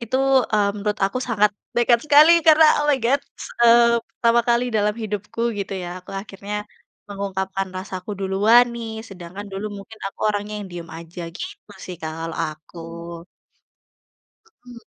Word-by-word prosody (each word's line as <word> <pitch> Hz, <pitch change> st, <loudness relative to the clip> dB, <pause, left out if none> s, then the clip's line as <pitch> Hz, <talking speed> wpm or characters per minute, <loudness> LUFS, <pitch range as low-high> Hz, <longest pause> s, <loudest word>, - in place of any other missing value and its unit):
itu, 235 Hz, +2 st, -2 dB, 0.4 s
eee, 205 Hz, -1 st, +3 dB
menurut 210 Hz, +1 st, -2 dB
aku 195 Hz, +6 st, -1 dB
sangat 210 Hz, -4 st, +2 dB, 0.2 s
nekat 240 Hz, 0 st, +4 dB
sekali, 310 Hz, +4 st, +7 dB
karena 315 Hz, 0 st, +8 dB, 0.2 s
oh, 295 Hz, -, 0 dB
my 290 Hz, -, +4 dB
God, 275 Hz, +4 st, +3 dB, 0.4 s
eee, 235 Hz, 0 st, +6 dB
pertama 235 Hz, 0 st, +2 dB
kali 240 Hz, +1 st, +3 dB
dalam 210 Hz, -1 st, +1 dB
hidupku 220 Hz, +2 st, -3 dB
gitu 200 Hz, -, -4 dB
ya, 180 Hz, 0 st, -6 dB
aku 180 Hz, -, -14 dB
akhirnya 205 Hz, +1 st, -6 dB, 0.5 s
mengungkapkan 195 Hz, -1 st, -3 dB
rasaku 185 Hz, +1 st, -6 dB
duluan 205 Hz, +5 st, +5 dB
nih, 225 Hz, -1 st, -6 dB
sedangkan 185 Hz, +1 st, -9 dB
dulu 195 Hz, +2 st, -4 dB, 0.2 s
mungkin 220 Hz, +3 st, -15 dB
aku 195 Hz, -, -8 dB
orangnya 205 Hz, 0 st, -4 dB
yang 195 Hz, -, -9 dB
diam 170 Hz, -1 st, -7 dB
aja, 170 Hz, +1 st, -9 dB
gitu 375 Hz, -, -9 dB
sih, 180 Hz, -, -6 dB
Kak, 160 Hz, 0 st, -4 dB
kalau 165 Hz, 0 st, -5 dB
aku. 155 Hz, +3 st, -12 dB, 1.9 s
Mhm. 240 Hz, -1 st, -12 dB
210 Hz, 150 wpm, -22 LUFS, 190-235 Hz, 1.9 s, karena